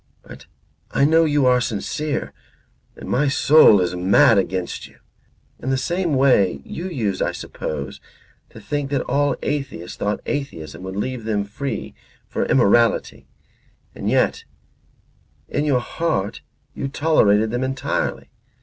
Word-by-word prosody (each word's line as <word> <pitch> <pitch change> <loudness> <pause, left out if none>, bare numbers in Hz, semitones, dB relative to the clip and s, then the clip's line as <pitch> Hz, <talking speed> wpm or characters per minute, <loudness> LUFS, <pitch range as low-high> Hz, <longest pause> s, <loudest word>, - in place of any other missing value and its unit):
But - - -13 0.4
I 140 - +2
know 160 +2 +4
you 145 -3 +2
are 125 -1 +4
sincere 140 +7 -3 0.6
and - - -10
my 145 +3 +1
soul 140 -6 +6
is 90 0 -1
mad 100 +5 +5
against 95 -2 -3
you. - - -22 0.6
In 130 - -4
the 135 - +1
same 170 +2 -1
way 105 - +3
you 180 +3 -6
used, 110 - -2
I - - +1
suppose, 70 -3 -6 0.5
to - - -13
think 145 -1 -3
that 140 -2 0
all 140 0 +1
atheists 135 - -4
thought 105 +1 -1
atheism 135 - -5
would 95 0 -6
leave 120 +2 -3
them 105 -2 0
free 100 - -5 0.3
for - - -2
immorality 115 +3 +2 0.7
and - - -3
yet - - +1 1.0
in 145 - -1
your 135 -4 +2
heart 120 - -2 0.3
you 135 - -4
tolerated 110 -8 +2
them 120 +2 -1
entirely. 130 0 -2
130 Hz, 140 wpm, -21 LUFS, 100-145 Hz, 1.0 s, soul